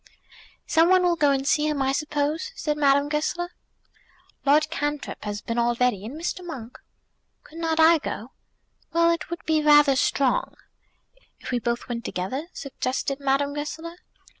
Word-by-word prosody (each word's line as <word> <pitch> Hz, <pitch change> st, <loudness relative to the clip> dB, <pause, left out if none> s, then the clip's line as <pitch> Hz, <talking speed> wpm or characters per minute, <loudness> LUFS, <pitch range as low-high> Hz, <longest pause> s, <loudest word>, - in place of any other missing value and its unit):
"Some 325 Hz, +2 st, +4 dB
one 370 Hz, -1 st, +5 dB
will 350 Hz, -1 st, +3 dB
go 295 Hz, -3 st, +3 dB
and 270 Hz, -1 st, +1 dB
see 300 Hz, +1 st, +2 dB
him, 300 Hz, -2 st, -1 dB
I 270 Hz, 0 st, +1 dB
suppose," 295 Hz, -, -1 dB
said 300 Hz, -9 st, -1 dB
Madame 285 Hz, -1 st, +3 dB
Goesler. 310 Hz, +4 st, -2 dB, 1.0 s
"Lord 305 Hz, +2 st, +4 dB
Cantrip 295 Hz, -2 st, -3 dB
has 205 Hz, 0 st, -4 dB
been 230 Hz, +1 st, -2 dB
already, 240 Hz, -3 st, +1 dB
and 285 Hz, +7 st, -8 dB
Mr. 355 Hz, +2 st, -3 dB
Monk." 255 Hz, -9 st, -8 dB, 0.6 s
"Could 325 Hz, -, -12 dB
not 325 Hz, -1 st, 0 dB
I 325 Hz, 0 st, +6 dB
go?" 235 Hz, -2 st, -6 dB, 0.6 s
"Well, 335 Hz, 0 st, +4 dB
it 335 Hz, -1 st, -3 dB
would 340 Hz, 0 st, -6 dB
be 315 Hz, -1 st, +2 dB
rather 295 Hz, -2 st, +6 dB
strong." 280 Hz, -, +1 dB, 0.8 s
"If -, -, -7 dB
we 245 Hz, -, +1 dB
both 235 Hz, 0 st, -2 dB
went 235 Hz, -2 st, -4 dB
together?" 255 Hz, -, -4 dB
suggested 275 Hz, -1 st, -3 dB
Madame 280 Hz, +1 st, +1 dB
Goesler. 320 Hz, +3 st, -6 dB
295 Hz, 160 wpm, -25 LUFS, 265-325 Hz, 1.0 s, I